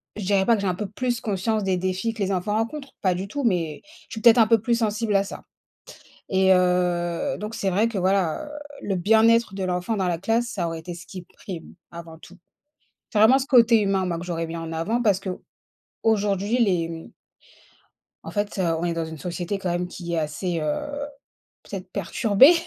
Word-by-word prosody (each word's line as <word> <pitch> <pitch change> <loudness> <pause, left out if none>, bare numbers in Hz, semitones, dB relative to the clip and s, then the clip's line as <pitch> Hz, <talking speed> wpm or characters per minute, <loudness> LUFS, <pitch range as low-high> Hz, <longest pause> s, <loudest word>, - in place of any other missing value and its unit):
je 210 - -5
dirais 195 0 +2
pas 235 - +5
que 200 - -3
j'ai 195 - -1
un 180 - 0
peu 210 +3 -4
plus 240 +3 -2
conscience 210 +1 -1
des 190 -1 +1
défis 185 +5 -1
que 210 - -8
les 195 0 0
enfants 190 +3 -1
rencontrent, 270 +6 -3
pas 185 -2 +2
du 190 +2 -4
tout, 285 +6 -4
mais 170 -8 0 0.3
je - - -9
suis 220 - -5
peut-être 235 -1 +7
un 225 - +7
peu 225 -1 +3
plus 235 +1 +1
sensible 215 -1 0
à 195 - +4
ça, 195 - -9 0.9
et 190 0 +4
heu 180 +5 +1
donc 215 +2 -5
c'est 195 -2 -1
vrai 210 +5 +2
que 225 - -6
voilà, 190 - +1
heu, - - -9 0.3
le 195 - -1
bien-être 225 +3 +4
de 190 -1 -3
l'enfant 180 +4 -1
dans 190 -2 0
la 170 -2 -1
classe, 225 +5 0
ça 180 -7 -2
aurait 165 -1 -4
été 175 +1 -7
ce 175 +1 -11
qui 185 0 -8
prime 175 0 -10 0.2
avant 165 -1 -10
tout. - - -15 0.7
C'est 215 - -1
vraiment 235 +5 +7
ce 270 - -3
côté 235 -5 +6
humain, 195 -2 +1
moi, 170 -2 -2
que 175 - -6
j'aurais 165 -1 -2
mis 165 +1 -6
en 165 0 -6
avant, 190 +9 -1
parce 205 -5 +3
que 195 -1 -5 0.7
aujourd'hui 205 0 +1
les, 175 -4 +1
mmh 165 -1 -8 1.1
En - - -7
fait, 205 -1 -2
heu, 190 - +1 0.2
on - - -3
est 170 - 0
dans 165 -1 -2
une 160 0 -8
société 180 +4 -3
quand 185 -2 -3
même 175 +1 -1
qui 175 -1 -6
est - - 0
assez, 165 +3 -2
heu, 285 - -3 0.6
peut-être - - -7
perturbée 230 - +5
195 Hz, 220 wpm, -24 LUFS, 175-220 Hz, 1.1 s, peut-être